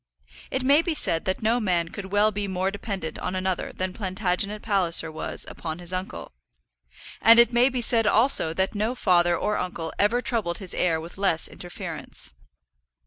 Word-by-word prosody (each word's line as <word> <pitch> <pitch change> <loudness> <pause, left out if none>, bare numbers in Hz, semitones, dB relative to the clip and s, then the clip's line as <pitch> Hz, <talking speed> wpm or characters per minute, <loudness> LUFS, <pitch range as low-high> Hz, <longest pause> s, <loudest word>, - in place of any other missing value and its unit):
It 265 - -2
may 280 +4 +5
be 335 -2 -2
said 165 - +1
that 185 +3 -2
no 230 +3 +2
man 175 -6 0
could 190 +1 -9
well 205 +1 +3
be 205 0 -3
more 190 0 -2
dependent 195 -5 -5
on 180 - -4
another 185 0 -2
than 185 0 -4
Plantagenet 195 +1 -2
Palliser 175 -6 +1
was 155 - -5
upon 160 -1 -6
his 175 0 -6
uncle; 185 +1 -6 0.9
and 230 +1 +7
it 235 0 +6
may 245 +2 +4
be 255 -2 -3
said 230 -2 +4
also 220 -8 +5
that 190 +3 -1
no 215 +4 -2
father 175 -5 +2
or 210 - -1
uncle 165 -3 -5
ever 215 +4 +2
troubled 220 -9 -2
his 190 -3 -6
heir 165 -3 +1
with 170 +4 -10
less 190 -5 +1
interference. 175 0 -8
190 Hz, 180 wpm, -24 LUFS, 175-220 Hz, 0.9 s, and